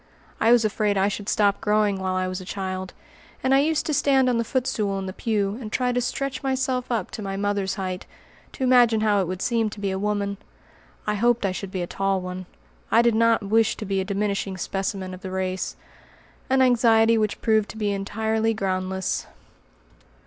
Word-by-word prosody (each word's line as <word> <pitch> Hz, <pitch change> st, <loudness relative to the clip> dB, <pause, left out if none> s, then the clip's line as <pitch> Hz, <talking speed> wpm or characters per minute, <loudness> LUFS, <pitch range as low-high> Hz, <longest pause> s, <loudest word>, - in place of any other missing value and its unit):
I 225 Hz, -, +4 dB
was 240 Hz, -2 st, +5 dB
afraid 210 Hz, -1 st, +1 dB
I 195 Hz, +1 st, +3 dB
should 205 Hz, 0 st, -4 dB
stop 200 Hz, -1 st, +2 dB
growing 210 Hz, -2 st, +2 dB
while 185 Hz, -1 st, -1 dB
I 185 Hz, 0 st, 0 dB
was 185 Hz, +1 st, -4 dB
a -, -, -8 dB
child, 185 Hz, 0 st, -5 dB, 0.5 s
and 260 Hz, -, +3 dB
I 270 Hz, -, +6 dB
used 310 Hz, +2 st, +1 dB
to 305 Hz, -, -1 dB
stand 270 Hz, -2 st, +3 dB
on 240 Hz, -2 st, +1 dB
the -, -, +1 dB
footstool 220 Hz, -5 st, -1 dB
in 195 Hz, -, -4 dB
the 185 Hz, -, -5 dB
pew, 205 Hz, 0 st, -1 dB
and 215 Hz, -3 st, -7 dB
try 250 Hz, +1 st, +1 dB
to 245 Hz, 0 st, 0 dB
stretch 260 Hz, +2 st, -3 dB
myself 260 Hz, -2 st, -1 dB
up 220 Hz, -6 st, -1 dB
to 220 Hz, -, -6 dB
my 195 Hz, -1 st, -4 dB
mother's 200 Hz, -1 st, -1 dB
height, 185 Hz, -2 st, -4 dB, 0.5 s
to -, -, -4 dB
imagine 245 Hz, -3 st, +5 dB
how 210 Hz, -2 st, +3 dB
it 185 Hz, -, -2 dB
would 185 Hz, +1 st, -4 dB
seem 230 Hz, -3 st, +1 dB
to 210 Hz, -, -10 dB
be 200 Hz, -1 st, -1 dB
a 190 Hz, -, -2 dB
woman. 200 Hz, -1 st, -1 dB, 0.7 s
I 210 Hz, -, 0 dB
hoped 235 Hz, +1 st, +2 dB
I 195 Hz, -, +1 dB
should 190 Hz, +1 st, -5 dB
be 185 Hz, -1 st, -3 dB
a -, -, -1 dB
tall 195 Hz, +2 st, 0 dB
one. 180 Hz, 0 st, -6 dB, 0.4 s
I 230 Hz, -, +5 dB
did 235 Hz, -1 st, +4 dB
not 230 Hz, 0 st, +3 dB
wish 220 Hz, +2 st, +2 dB
to 215 Hz, -, -5 dB
be 195 Hz, -1 st, 0 dB
a -, -, -1 dB
diminishing 200 Hz, -1 st, -2 dB
specimen 195 Hz, 0 st, -3 dB
of 185 Hz, -, -9 dB
the 190 Hz, -, -6 dB
race; 185 Hz, 0 st, -2 dB, 0.7 s
an 265 Hz, 0 st, +4 dB
anxiety 230 Hz, -2 st, +4 dB
which 215 Hz, -2 st, 0 dB
proved 220 Hz, -2 st, +2 dB
to -, -, -9 dB
be 210 Hz, -2 st, 0 dB
entirely 220 Hz, +3 st, -1 dB
groundless. 190 Hz, -2 st, -2 dB
210 Hz, 210 wpm, -24 LUFS, 190-230 Hz, 0.7 s, I